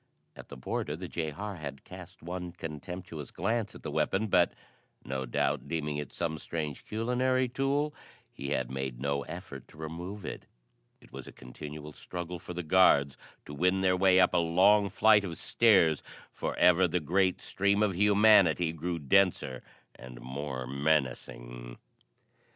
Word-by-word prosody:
At - - -12
the - - -9
border 70 +3 -3
the 90 +3 -7
jehar 85 +5 -4
had 70 -2 -7
cast - - -12
one 90 0 -5
contemptuous 80 -2 -7
glance 110 +4 -2
at - - -12
the - - -4
weapon, 100 +3 0
but, 90 -2 +4 0.5
no 65 0 -3
doubt - - -1
deeming 75 -3 -2
it 75 - -5
some 80 -2 -3
strange 75 -4 -4
culinary 125 +3 0
tool, 140 +4 0 0.4
he 70 - -6
had 65 -3 -1
made 65 -2 -4
no 70 +1 -1
effort 85 -4 -9
to - - -18
remove 85 +6 -7
it. - - -7 0.5
It - - -19
was - - -8
a - - -9
continual 75 +4 -9
struggle 90 +1 -6
for 90 0 -8
the 90 - -3
guards 75 -5 +4 0.3
to 75 - -9
win 90 +5 +1
their 95 -1 +3
way 95 0 +5
up 90 - +4
a - - +3
long 95 +5 +4
flight 110 0 +5
of 85 -4 -5
stairs, 95 -9 +3 0.3
for - - -4
ever 90 +1 +5
the 90 +2 0
great 90 +4 +1
stream 100 +2 +1
of 100 -4 +1
humanity 100 -4 +5
grew 85 +2 -3
denser 80 -4 +2 0.3
and 60 -1 -11
more 65 +1 -5
menacing. - - -2
85 Hz, 160 wpm, -30 LUFS, 75-95 Hz, 0.5 s, way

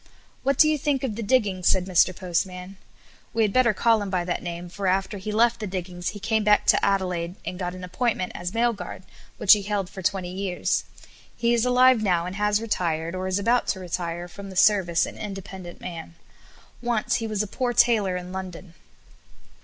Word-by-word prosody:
"What 275 0 +1
do 310 - +7
you 305 -1 +1
think 275 -1 0
of 235 -6 -2
the 230 - -4
diggings?" 205 -5 +1
said 185 -1 +3
Mr. 185 0 +3
Postman. 180 +1 -3 0.6
We 225 - +3
had 205 -2 0
better 255 -2 +4
call 225 +1 +2
him 200 - -4
by 180 -2 -1
that 175 - -2
name, 175 0 -6
for 190 +3 -4
after 195 +2 0
he 210 +3 -5
left 235 +2 +3
the 215 - -4
diggings 180 -1 -4
he 205 - -8
came 220 +2 0
back 210 0 +4
to - - +4
Adelaide 180 -3 0
and 180 - -5
got 180 -1 -3
an 185 - -9
appointment 185 +1 -1
as 175 +1 -4
mail 235 +2 +2
guard, 205 - -8 0.3
which - - +7
he 210 - +2
held 200 -2 -2
for 190 - -8
twenty 185 -1 -1
years. 190 -2 -1 0.5
He 235 0 +2
is 235 0 +2
alive 250 -1 +5
now 180 -5 +1
and 180 +1 -5
has 210 0 +2
retired, 170 -7 -2
or 185 0 -3
is 185 0 0
about 235 +5 +1
to 190 - -1
retire 175 -1 -4
from 195 +2 -10
the 190 - -10
service 190 -3 +4
an - - -9
independent 190 -3 -8
man. 165 -1 -8 0.7
Once 240 -3 0
he 225 - -3
was 215 -1 -1
a - - -5
poor 245 +4 -2
tailor 215 -6 +3
in 180 0 -7
London. 185 -2 -7
195 Hz, 210 wpm, -25 LUFS, 180-220 Hz, 0.7 s, do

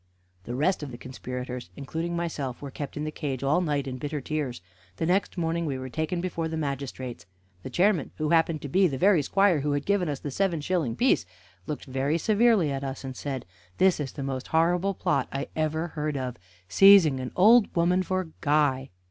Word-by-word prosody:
The 120 - -4
rest 160 +8 +1
of 145 - -5
the 120 - -8
conspirators, 125 -2 -6
including 165 +5 -4
myself, 150 -7 -3
were 140 -1 -7
kept 145 +1 -6
in 150 - -2
the 155 - -3
cage 140 -4 -4
all 145 +6 +2
night 145 -5 -1
in 130 -1 -5
bitter 145 +2 -3
tears. 140 -3 -3 0.4
The 130 - -2
next 185 +3 +1
morning 165 0 -1
we 135 -2 -2
were 130 0 -6
taken 160 +4 -2
before 170 -3 -2
the 160 0 -4
magistrates. 135 - -5 0.3
The 130 - -7
chairman, 180 +1 +2
who 155 -1 -1
happened 165 -2 +2
to - - -3
be 185 +7 +3
the 135 -5 -3
very 185 0 +4
squire 195 +2 +3
who 145 +1 -1
had 145 0 -2
given 195 -4 +1
us 145 - -2
the 145 - -5
seven 180 +1 0
shilling 150 -6 -1
piece, 250 - +2 0.4
looked 150 - -4
very 135 +4 0
severely 215 -4 +3
at 135 0 -3
us, 135 0 -5
and 130 -1 -6
said: 135 -1 -4 0.3
"This 190 -3 +4
is 140 -3 -4
the 140 - -5
most 135 -1 -4
horrible 175 +4 +2
plot - - 0
I 135 +1 -4
ever 160 +2 -1
heard 150 -2 -3
of 130 -2 -3 0.3
seizing 185 - +7
an 130 0 -5
old 220 +4 +6
woman 180 +2 +3
for 185 0 -1
a 175 - -9
guy! 145 -3 +2
150 Hz, 210 wpm, -27 LUFS, 135-175 Hz, 0.4 s, seizing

